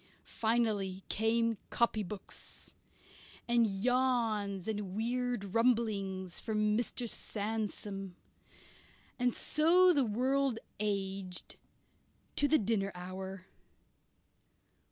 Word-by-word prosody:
Finally 215 -5 0
came 225 0 +2
copybooks; 210 -4 -2 0.7
and 235 -1 +4
yawns 215 -3 +1
and 205 -3 -3
weird 240 -3 -1
rumblings 210 -6 +1
from 210 -1 +1
Mr. 240 +1 -1
Sandsome. 205 -3 -4 1.0
And 245 -1 +2
so 355 +4 +5
the 285 -4 +4
world 255 +3 +1 0.2
aged 195 -3 -2 0.8
to 290 - +3
the 310 +2 +5
dinner 200 -3 0
hour. 185 +1 -6
220 Hz, 80 wpm, -33 LUFS, 195-240 Hz, 1.0 s, so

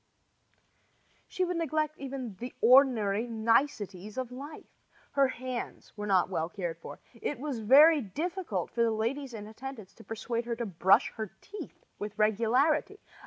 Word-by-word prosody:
She 370 - -1
would 355 -1 -2
even - - -1
neglect 275 - -3
the 245 +1 -7
ordinary 235 -4 +5
niceties 220 -3 0
of 255 -2 -3
life. 280 +5 -9 0.5
Her 275 -1 +4
hands 255 -1 -6
were 210 0 -5
not 190 -3 +3
well 165 -3 -2
cared 175 -4 -5
for. - - -9
It 250 +5 -4
was 275 -3 -4
very 290 +8 +7
difficult 285 - -3
for 235 - -1
the 230 - +4
ladies 235 +4 -2
in 210 -1 -7
attendance 220 -1 -9
to 225 - -15
persuade 230 +1 -3
her 235 -1 -2
to 235 0 -3
brush 190 -1 +3
her 220 -2 -3
teeth 415 - -10
with 210 +1 -6
regularity. 240 - +2
235 Hz, 155 wpm, -30 LUFS, 210-275 Hz, 0.5 s, very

